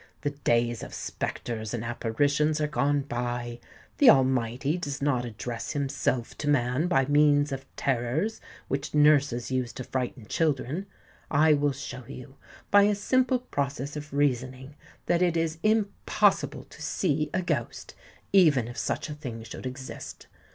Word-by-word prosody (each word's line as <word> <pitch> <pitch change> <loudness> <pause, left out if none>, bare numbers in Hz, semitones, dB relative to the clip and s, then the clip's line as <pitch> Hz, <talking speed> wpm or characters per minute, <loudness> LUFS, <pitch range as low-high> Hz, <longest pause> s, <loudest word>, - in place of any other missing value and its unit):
The 145 - -1
days 120 -4 0
of - - -8
spectres 110 -1 -4
and 115 -1 -4
apparitions 145 +6 +1
are 150 - +1
gone 145 -1 +1
by. 120 -2 -4 0.4
The 280 - +8
Almighty 130 - +3
does 145 -5 -4
not 130 -4 +1
address 115 +2 -5
himself 135 -4 -1
to 145 - -3
man 130 +3 +2
by 135 -6 +3
means 145 0 +4
of 135 0 -5
terrors 135 - -1 0.3
which 140 +2 -3
nurses 145 -5 +4
use 130 -2 -1
to 130 - -6
frighten 125 -2 -4
children. 155 - -1 0.4
I 155 +1 +5
will 145 0 +2
show 130 -2 -7
you, 135 +2 -10 0.3
by 205 - +8
a 210 0 +3
simple 255 +5 +2
process 140 - -3
of 150 0 -7
reasoning, 130 -1 -1 0.3
that 175 0 +2
it 175 -2 +2
is 165 0 -1
impossible 215 -2 +1
to - - -15
see - - 0
a - - -1
ghost—even 155 - 0
if 120 -1 -6
such - - -2
a 150 - -5
thing 125 -7 -7
should 115 +3 -7
exist. 130 +1 -8
140 Hz, 150 wpm, -27 LUFS, 125-150 Hz, 0.4 s, The